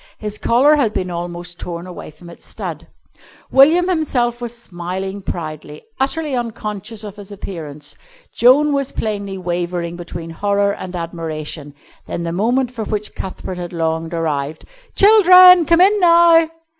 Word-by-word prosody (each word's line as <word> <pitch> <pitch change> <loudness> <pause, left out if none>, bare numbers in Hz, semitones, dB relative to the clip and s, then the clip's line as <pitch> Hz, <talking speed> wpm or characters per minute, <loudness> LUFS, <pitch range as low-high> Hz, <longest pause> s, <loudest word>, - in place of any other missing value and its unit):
His 210 -1 -5
collar 275 +6 +4
had 230 -7 +1
been 185 -1 -2
almost 175 0 -6
torn 170 0 -6
away 180 -2 -9
from 155 +3 -16
its 170 - -13
stud. - - -7 0.6
William 320 +7 +5
himself 250 -9 -1
was 240 0 -5
smiling 190 -1 -6
proudly, 155 -4 -7 0.2
utterly 280 +1 -1
unconscious 220 -2 -5
of 205 -1 -9
his 205 0 -11
appearance. 155 -7 -8 0.4
Joan 285 +5 +4
was 275 -1 -1
plainly 200 -3 -4
wavering 175 -1 -3
between 170 -1 -8
horror 200 +3 0
and 185 -2 -7
admiration. 160 -3 -6 0.3
Then 170 - -4
the 170 - -3
moment 240 +8 0
for 225 -3 -5
which 210 0 -4
Cuthbert 185 -1 -7
had 175 0 -6
longed 165 0 -2
arrived. 155 -2 -3 0.3
"Children! 365 -5 +7
come 335 +1 +4
in 410 +3 +5
now!" 335 -2 +5
200 Hz, 145 wpm, -18 LUFS, 170-260 Hz, 0.6 s, Children